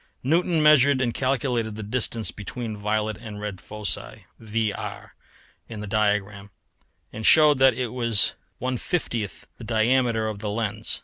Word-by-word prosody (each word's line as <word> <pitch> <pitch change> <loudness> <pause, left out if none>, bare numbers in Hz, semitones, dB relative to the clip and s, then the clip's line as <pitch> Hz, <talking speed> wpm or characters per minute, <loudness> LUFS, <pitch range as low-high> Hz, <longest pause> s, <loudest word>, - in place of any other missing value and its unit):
Newton 165 +3 +2
measured 140 -3 +6
and 120 -3 0
calculated 125 -4 -1
the 110 - -6
distance 115 0 0
between 110 +2 -6
the 105 - -9
violet 105 0 -1
and 110 -3 -9
red 105 -3 -6
foci 90 - -5 0.2
VR 110 -1 -3 0.6
in 110 -2 -7
the - - -5
diagram 105 -1 0 0.6
and 110 - -6
showed 150 +1 +6
that 130 -2 +5
it 125 -1 -2
was 115 -4 +2 0.3
1/50th 125 - -2 0.2
the - - -9
diameter 115 0 +1
of 105 -2 -4
the 105 0 -4
lens. 110 0 -3
110 Hz, 145 wpm, -24 LUFS, 105-125 Hz, 0.6 s, measured